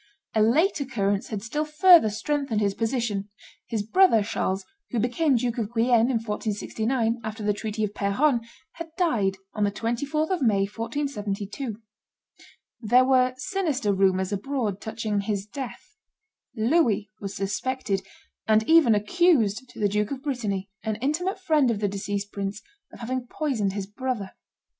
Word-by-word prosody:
A 220 - +3
late 300 - +3
occurrence 205 -8 -1
had 210 -3 -5
still 295 +7 -1
further 315 - +6
strengthened 275 +1 -1
his 200 -2 +1
position: 225 -3 -2 0.4
his 220 -3 -2
brother 225 - +4
Charles, 190 -2 -2 0.2
who 245 - -3
became 250 +6 +2
Duke 240 0 0
of 220 -1 -2
Guienne, 235 +1 +4
in 255 - +2
1469, 225 +2 -1
after 220 0 -5
the 205 0 +2
treaty 215 +1 -3
of 205 -1 -2
Peronne, 235 +7 +2 0.3
had 335 -1 -8
died 215 - +1 0.2
on 210 - -1
the 205 - +2
24th 280 - -1
of 365 -4 0
May, 210 -6 +3
1472. 220 -1 -4 1.0
There 250 +3 +4
were 255 -1 +3
sinister 285 - -1
rumors 190 0 +2
abroad 210 -1 -2
touching 220 -2 -2
his 200 -1 -2
death. 260 +3 -8 0.6
Louis 225 -4 +2
was 200 -1 -6
suspected, 200 +1 -2 0.5
and 220 0 +3
even 320 -9 +6
accused 250 - +2
to - - -13
the 205 - +3
Duke 210 +1 0
of 275 -1 -5
Brittany, 210 -9 -2
an 220 -1 -2
intimate 310 - -1
friend 310 -8 +3
of 230 - 0
the 205 - +1
deceased 200 +1 -3
prince, 200 +1 -4 0.3
of - - -13
having 250 +1 -3
poisoned 240 -10 -1
his 200 -1 -3
brother. 210 -1 -4
225 Hz, 150 wpm, -25 LUFS, 205-265 Hz, 1.0 s, further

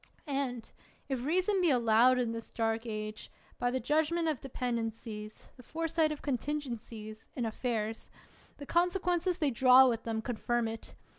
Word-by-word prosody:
And 270 -5 -2 0.4
(if 260 -3 -2
reason 370 +6 +2
be 350 - +4
allowed 240 0 +5
in 240 -2 0
this 230 0 -6
dark 225 0 -1
age, 215 -1 -5 0.3
by 245 - +1
the 260 +1 -1
judgment 315 +4 +1
of 300 -6 -1
dependencies, 225 -4 -4
the - - -11
fore 325 +6 -3
sight 320 -1 +2
of 300 - -6
contingencies, 235 -6 -4
in 240 - -1
affairs) 225 -1 -3 0.5
the 285 - -8
conse 350 +5 +2
quences 355 0 0
they 300 -6 +1
draw 260 +1 +7
with 230 -2 0
them 225 -1 -3
confirm 240 0 -1
it. 225 0 -7
250 Hz, 160 wpm, -31 LUFS, 225-300 Hz, 0.5 s, draw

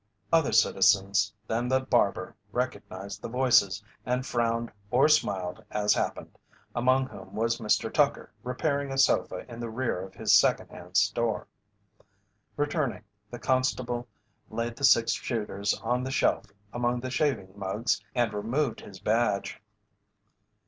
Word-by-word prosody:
Other 160 -3 +4
citizens 100 +1 +3
than 115 +3 -1
the 130 +1 +3
barber 120 -8 0 0.2
recognized 100 -5 -4
the - - -5
voices, 115 -5 +3 0.2
and 125 +1 -1
frowned 115 -1 -1 0.2
or 130 +6 +4
smiled 100 -12 +1
as 105 0 +2
happened, - - -3 0.3
among 130 +2 +2
whom 130 - -11
was 115 +1 0
Mr. 105 -2 0
Tucker - - +1
repairing 140 +2 -1
a 135 - -3
sofa 135 - +2
in 120 -2 -9
the 120 -1 -4
rear 115 -5 -2
of 95 0 -9
his - - +2
"Second - - +4
Hand 90 +2 -5
Store." 115 +1 +1 1.1
Returning, 145 -5 -1 0.3
the 120 - -7
constable 125 -1 0 0.4
laid 115 +1 -3
the 140 - +1
six 115 -3 +5
shooters 105 -3 -2
on 125 +1 0
the 130 - -3
shelf 135 - +1 0.3
among 120 0 0
the 130 0 -5
shaving 130 -10 0
mugs 105 +3 -1
and 120 -3 +1
removed 115 +6 -1
his 95 -2 -11
badge. 105 -1 0
120 Hz, 140 wpm, -28 LUFS, 105-130 Hz, 1.1 s, six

